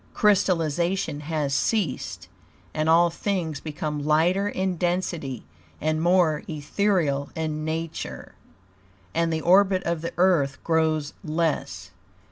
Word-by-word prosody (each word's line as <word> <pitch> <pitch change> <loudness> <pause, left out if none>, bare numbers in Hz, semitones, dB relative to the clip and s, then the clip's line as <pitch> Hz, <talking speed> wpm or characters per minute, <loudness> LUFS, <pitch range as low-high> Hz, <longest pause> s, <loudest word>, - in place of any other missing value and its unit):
Crystallization 175 -5 +1
has 150 -2 -2
ceased; 165 - -1 0.5
and 155 +1 0
all 170 +1 +5
things 170 -5 -2
become 150 -1 -4
lighter 170 +7 +2
in 190 -2 -1
density 170 - -2 0.3
and 155 +1 0
more 170 -3 +3
ethereal 150 -2 0
in 155 -1 -3
nature; 160 +1 -5 0.8
AND 165 +5 +1
THE 160 -1 -1
ORBIT 190 +2 +4
OF 170 -2 -1
THE 170 - -4
EARTH 170 -7 +3
GROWS 160 -2 +1
LESS. 155 - -2
160 Hz, 110 wpm, -25 LUFS, 150-180 Hz, 0.8 s, all